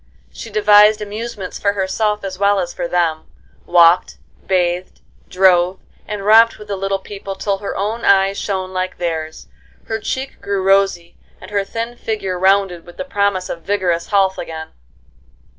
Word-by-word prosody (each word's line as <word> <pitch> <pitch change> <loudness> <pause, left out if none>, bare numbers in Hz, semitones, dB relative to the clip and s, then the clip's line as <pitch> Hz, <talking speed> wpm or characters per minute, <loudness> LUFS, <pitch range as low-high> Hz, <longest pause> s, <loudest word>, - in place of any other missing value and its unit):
She 65 - -8
devised 210 0 +5
amusements 210 -1 -6
for 200 0 +1
herself 210 +2 -1
as 190 -1 -6
well 200 0 +3
as 175 -2 -3
for - - -3
them; 170 -3 -1 0.4
walked, 175 0 +4 0.3
bathed, 180 -1 -1 0.3
drove, 185 0 +3 0.3
and 205 -2 -5
romped 225 +2 +6
with 210 -1 -13
the 200 - -1
little 195 0 -1
people 195 0 -8
till 195 0 -2
her 200 - -5
own 215 +4 -2
eyes 195 0 +3
shone 190 -2 -3
like 185 0 -3
theirs, 160 -2 -4 0.4
her 220 0 -3
cheek 260 +4 -5
grew 200 -1 -2
rosy, 195 -3 +1 0.2
and - - -12
her 200 -1 0
thin 230 +4 -5
figure 205 -6 -3
rounded 190 -2 +2
with 175 - -15
the 275 - -4
promise 200 -7 0
of 170 - -6
vigorous 185 -4 -1
health 195 -2 +2
again. 160 -2 -6
195 Hz, 160 wpm, -18 LUFS, 180-205 Hz, 0.4 s, romped